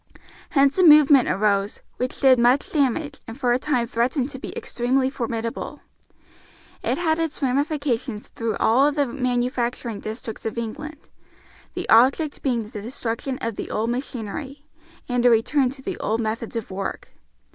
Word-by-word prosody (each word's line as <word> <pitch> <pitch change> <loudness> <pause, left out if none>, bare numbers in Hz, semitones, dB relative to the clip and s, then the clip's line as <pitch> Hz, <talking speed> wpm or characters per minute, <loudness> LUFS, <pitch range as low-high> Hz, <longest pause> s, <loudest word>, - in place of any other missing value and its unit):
Hence 275 +4 +3
a - - +5
movement 295 -4 +7
arose, 200 0 +1 0.2
which 250 0 -3
did 260 -2 +5
much 245 +4 +3
damage 285 0 0
and 225 +4 -9
for 245 -3 +2
a 245 - +1
time 255 -4 0
threatened 250 +4 -1
to 265 - -7
be - - -6
extremely 260 +2 0
formidable. 230 -3 -4 1.0
It - - -1
had 320 -2 +1
its 325 -2 -2
ramifications 270 -4 -1
through 230 -2 -3
all 270 +6 +4
the 290 -1 +1
manufacturing 245 -3 -2
districts 220 0 -7
of 225 0 -4
England, 290 +7 -6 0.7
the - - -4
object 270 +6 +4
being 235 -5 -1
the 215 -3 -7
destruction 240 +2 -4
of 230 -2 -3
the - - -4 0.2
machinery, 260 +3 -5 0.4
and 245 -1 0
a 245 - +6
return 250 +4 +3
to 265 +1 -10
the - - -4
old 220 +2 -1
methods 230 +1 -3
of 225 -4 -4
work. 190 +1 -5
250 Hz, 155 wpm, -23 LUFS, 230-280 Hz, 1.0 s, movement